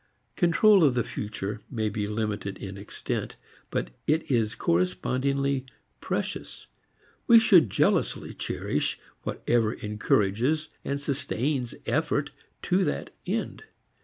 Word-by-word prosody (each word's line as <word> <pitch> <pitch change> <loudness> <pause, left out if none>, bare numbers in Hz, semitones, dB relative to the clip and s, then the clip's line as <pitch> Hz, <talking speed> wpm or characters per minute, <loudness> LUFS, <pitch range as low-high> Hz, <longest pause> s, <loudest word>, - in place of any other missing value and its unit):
Control 190 +2 +5
of 135 -5 +4
the 120 - +2
future 105 0 -5
may 110 -4 -1
be 105 0 -2
limited 105 -2 -3
in 95 -1 -7
extent, 100 +1 -4 0.3
but - - -2 0.2
it 155 -1 +1
is 115 -2 +1
correspondingly 130 +11 0 0.3
precious; - - -4 0.6
we 235 - +9
should 185 - +6
jealously - - +1
cherish - - -2 0.2
whatever 115 -2 0
encourages 105 +8 +1
and 140 0 -2
sustains 135 -2 -1
effort 145 -1 0 0.3
to 185 +2 +2
that 150 - -2
end. - - -2
125 Hz, 110 wpm, -27 LUFS, 105-145 Hz, 0.6 s, we